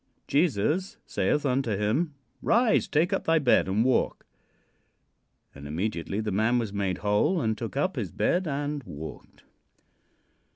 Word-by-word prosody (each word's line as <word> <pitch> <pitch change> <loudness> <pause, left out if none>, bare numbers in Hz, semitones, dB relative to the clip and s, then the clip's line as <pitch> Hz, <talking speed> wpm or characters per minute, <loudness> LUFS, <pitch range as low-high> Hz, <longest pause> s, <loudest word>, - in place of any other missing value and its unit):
"Jesus 155 - +1
saith 150 0 0
unto 125 -6 0
him: 135 - 0 0.3
'Rise, 235 -1 +3
take 160 +4 +1
up - - -1
thy 165 0 +4
bed 135 -10 +3
and 105 +5 +1
walk.' 130 - +1 1.3
"And 70 +1 -10
immediately 90 +4 -2
the 110 -1 -2
man 110 +5 +2
was 110 -4 -2
made 95 -3 -1
whole 105 - +2
and 110 -6 0
took 115 +4 -6
up 185 +6 0
his - - -2
bed 180 0 +1
and 145 0 -2
walked." 75 -3 -10
120 Hz, 140 wpm, -27 LUFS, 105-150 Hz, 1.3 s, thy